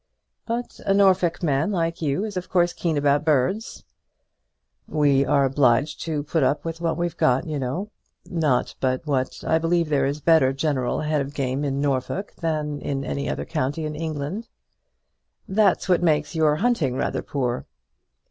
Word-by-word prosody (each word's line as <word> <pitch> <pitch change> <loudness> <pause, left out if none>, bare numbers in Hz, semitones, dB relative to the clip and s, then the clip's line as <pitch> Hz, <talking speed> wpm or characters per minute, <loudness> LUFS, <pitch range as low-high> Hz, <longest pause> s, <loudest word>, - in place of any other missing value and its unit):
"But 235 +1 -4
a 195 - +4
Norfolk 185 -4 +3
man 150 +4 +1
like 165 -3 -1
you 150 +5 0
is 210 -2 -6
of 180 0 -4
course 175 -1 +2
keen 165 -4 -1
about 145 0 +2
birds." 155 - 0 1.0
"We 145 -3 +3
are 140 0 +3
obliged 135 +1 +2
to 155 -3 -2
put 160 +2 0
up 140 +4 +1
with 165 0 -5
what 165 -2 0
we've 175 -1 -2
got, 130 +6 +2
you 155 -3 -3
know; 165 +12 -3 0.3
not 155 -8 0
but 130 +2 -1
what 135 -4 -2
I 160 - +3
believe 165 0 +1
there 140 -2 +2
is 140 +1 -2
a 150 - -17
better 160 -5 +4
general 135 -2 -1
head 155 -1 0
of 140 +1 -6
game 135 +1 -1
in 140 -1 -1
Norfolk 145 +8 -2
than 150 -3 -2
in 140 -1 -3
any 140 +2 -3
other - - -3
county 155 0 -2
in 150 0 -4
England." 160 +7 -4 1.0
"That's 200 -1 +2
what 180 -2 +3
makes 155 -3 +1
your 155 -2 +3
hunting 160 - +1
rather - - -1
poor." 125 -3 -3
150 Hz, 175 wpm, -24 LUFS, 140-170 Hz, 1.0 s, a